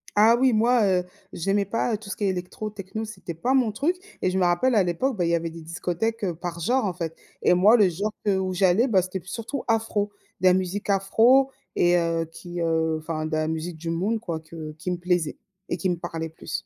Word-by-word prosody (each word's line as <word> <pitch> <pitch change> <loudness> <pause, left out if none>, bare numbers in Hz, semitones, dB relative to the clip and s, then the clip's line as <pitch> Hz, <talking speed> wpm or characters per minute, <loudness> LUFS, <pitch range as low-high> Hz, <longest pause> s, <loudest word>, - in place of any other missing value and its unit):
Ah 220 +3 +6
oui, 260 0 +4
moi, 230 +1 +3
heu, 180 -2 +2 0.3
j'aimais 195 +4 0
pas, 230 +3 -1
heu, - - 0
tout 205 -1 -12
ce - - -4
qui 205 - -1
est - - +3
électro, 190 +4 -3
techno, 210 +2 -6
c'était 190 -5 -7
pas 240 +11 0
mon 250 -5 +3
truc 290 - 0 0.3
et 185 - +2
je 185 - -1
me 185 - +2
rappelle 175 +9 +3
à 200 - +5
l'époque, 200 +10 0
bah, 180 - 0
il 170 - +1
y 170 - +3
avait 165 0 -2
des 165 0 -10
discothèques, 180 +7 -2
heu, 175 -3 -2
par 170 0 -5
genre, 250 +8 +1
en 195 - 0
fait. 165 -2 -4 0.3
Et - - +5
moi 200 +6 +6
le 205 -4 +5
genre 200 +5 -2
que 200 -2 +3
où 185 -1 -1
j'allais, 190 +6 +3
bah, 195 -4 +4
c'était 185 0 -5
p - - -23
surtout 230 +7 -4
afro, 220 -2 +1 0.3
de 185 - +5
la 180 - +7
musique 190 +2 -2
afro 225 +7 +4 0.3
et 175 0 +4
heu, 165 -1 0
qui, 175 +1 -8
heu, 160 -1 +1
enfin 155 0 -3
de 155 - -5
la 155 0 0
musique 160 +1 -3
du 165 +1 -5
monde, 195 +7 0
quoi, 170 -7 -4
que 160 -1 -8
qui 165 +4 -4
me 180 - -1
plaisait 175 -3 0 0.3
et - - -1
qui 190 - -1
me 175 - +1
parlait 165 -1 -5
plus. 160 - -6
185 Hz, 250 wpm, -25 LUFS, 170-215 Hz, 0.3 s, la